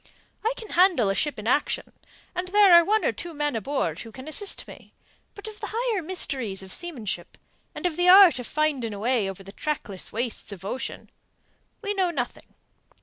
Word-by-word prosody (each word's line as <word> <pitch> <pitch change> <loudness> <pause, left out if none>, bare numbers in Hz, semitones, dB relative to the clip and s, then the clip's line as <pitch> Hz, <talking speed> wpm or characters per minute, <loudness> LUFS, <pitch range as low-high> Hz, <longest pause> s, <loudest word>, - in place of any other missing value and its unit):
I 450 - +2
can 440 - -8
handle 340 - +4
a - - +1
ship 295 +8 -1
in 210 - -7
action, 285 +4 0 0.4
and 360 0 -3
there 400 -1 +6
are 340 0 +9
one 430 +5 +1
or - - +3
two 340 -2 -7
men 295 -3 -1
aboard 270 +6 -2
who 225 - -9
can 260 +5 -10
assist 390 +6 -3
me; - - -14 0.4
but 405 +1 -9
of 430 -1 -9
the - - -5
higher 465 -4 0
mysteries 265 - 0
of 190 - -7
seamanship 235 - -5 0.4
and - - -6
of 345 -3 0
the 355 0 +3
art 370 -7 +8
of 250 - -6
finding 280 -8 -1
a - - -7
way 225 -3 +1
over 195 0 -8
the 195 - -10
trackless 215 - -4
wastes 230 -2 -3
of 190 -1 -9
ocean, 255 +6 -5 0.7
we 410 -1 -1
know 380 -3 +1
nothing. 260 -8 -5
295 Hz, 200 wpm, -25 LUFS, 225-365 Hz, 0.7 s, are